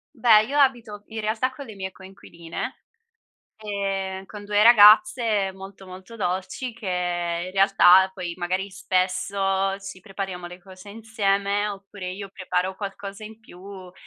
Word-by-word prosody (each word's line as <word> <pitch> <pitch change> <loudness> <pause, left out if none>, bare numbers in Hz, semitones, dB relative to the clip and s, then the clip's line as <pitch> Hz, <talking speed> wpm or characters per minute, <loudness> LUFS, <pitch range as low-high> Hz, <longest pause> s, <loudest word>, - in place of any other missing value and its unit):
Beh, 225 -3 +5
io 285 +6 -1
abito 235 -6 +1
in 220 -1 -6
realtà 220 +4 -1
con 280 +1 -10
le 220 - -10
mie 190 -1 -6
coinquiline, 175 -3 -9 0.7
ehm, 195 -2 -4
con 205 -1 -10
2 205 0 +1
ragazze 220 - +6
molto, 195 0 -12
molto 190 +5 -11
dolci, 190 +6 -3
che 220 -3 -11 0.6
in - - -7
realtà 190 -1 +5
poi 175 -3 -6
magari 185 +2 -2
spesso 195 +1 -1
ci 195 -1 -10
prepariamo 190 -2 -6
le 180 +1 -11
cose 185 +2 -14
insieme, 205 -2 -1
oppure 195 -2 -7
io 195 +1 -8
preparo 185 0 -2
qualcosa 200 +1 -7
in 215 +1 -10
più 190 -2 -12
195 Hz, 140 wpm, -24 LUFS, 190-215 Hz, 0.7 s, ragazze